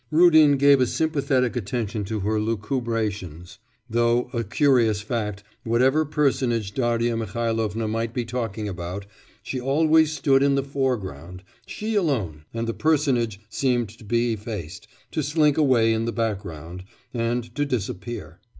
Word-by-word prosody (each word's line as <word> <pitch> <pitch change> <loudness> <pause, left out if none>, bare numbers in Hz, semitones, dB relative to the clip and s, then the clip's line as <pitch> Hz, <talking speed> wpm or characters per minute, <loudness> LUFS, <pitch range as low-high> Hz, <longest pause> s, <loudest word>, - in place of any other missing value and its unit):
Rudin 155 -3 +6
gave 140 -1 +5
a 125 - +3
sympathetic 135 -6 0
attention 110 -2 -3
to 105 +1 -3
her 105 +2 0
lucubrations, 105 - -3 0.3
though 120 +1 +1
a 115 -1 -1
curious 115 -2 +2
fact 105 -3 -3 0.2
whatever 130 +7 +2
personage 130 -8 0
Darya 120 -1 +1
Mihailovna 115 0 -2
might 115 +1 -2
be 120 0 -3
talking 110 -3 -3
about, 90 +1 -5 0.4
she 130 - -4
always 155 +4 +3
stood 140 -3 +2
in 140 0 +3
the 135 - +1
foreground, 100 - -3 0.2
she 220 +1 -4
alone, 110 - -1
and 115 0 -3
the 115 - -1
personage 130 -10 +1
seemed 120 -1 0
to 115 +2 -15
be 115 +2 +1
effaced, 105 -3 -7 0.2
to 155 - -1
slink 150 0 +2
away 125 -7 +3
in 110 0 -1
the 115 - -1
background, 90 -7 -4 0.3
and 120 0 -2
to 145 - 0
disappear. 110 - -4
115 Hz, 140 wpm, -24 LUFS, 105-135 Hz, 0.4 s, Rudin